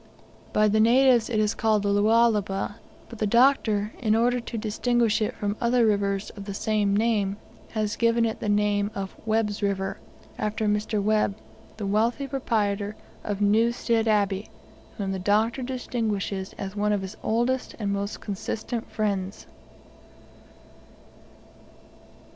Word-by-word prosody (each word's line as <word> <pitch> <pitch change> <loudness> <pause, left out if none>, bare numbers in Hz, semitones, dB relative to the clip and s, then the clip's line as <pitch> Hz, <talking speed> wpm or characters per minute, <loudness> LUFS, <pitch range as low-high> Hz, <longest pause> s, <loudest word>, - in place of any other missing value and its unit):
By 215 0 +3
the 215 +1 +2
natives 240 +1 +5
it 220 -3 0
is 210 0 +2
called 215 -2 +1
the 200 - +1
Lualaba, 205 -1 +2 0.3
but 230 - -11
the 215 - +1
Doctor, 225 -3 +3
in 220 -3 +2
order 245 +2 +2
to 235 -1 -6
distinguish 225 +1 +1
it 215 - -1
from 205 0 -2
other 240 0 +3
rivers 200 -1 0
of 200 -1 -10
the 200 -1 -5
same 205 -2 +1
name, 210 -3 +1 0.4
has 215 -2 -1
given 230 0 +2
it 225 - -2
the 210 - -2
name 205 0 +2
of 195 -1 -5
"Webb's 215 -1 0
River," 195 -1 -1 0.4
after 215 +1 -1
Mr. 210 +1 0
Webb, 210 0 +1 0.4
the 210 - -4
wealthy 225 +7 +1
proprietor 215 -6 -1 0.3
of 205 -1 -3
Newstead 225 +2 +2
Abbey, 205 -1 +1 0.5
whom 195 -2 -2
the 190 - -3
Doctor 215 +6 +1
distinguishes 220 -6 -3
as 195 0 -5
one 210 0 +1
of 200 -2 -1
his 190 +2 -7
oldest 240 +3 0
and 200 -3 -2
most 200 +1 -3
consistent 220 +3 -4
friends. 200 -2 -2
215 Hz, 140 wpm, -26 LUFS, 200-230 Hz, 0.5 s, natives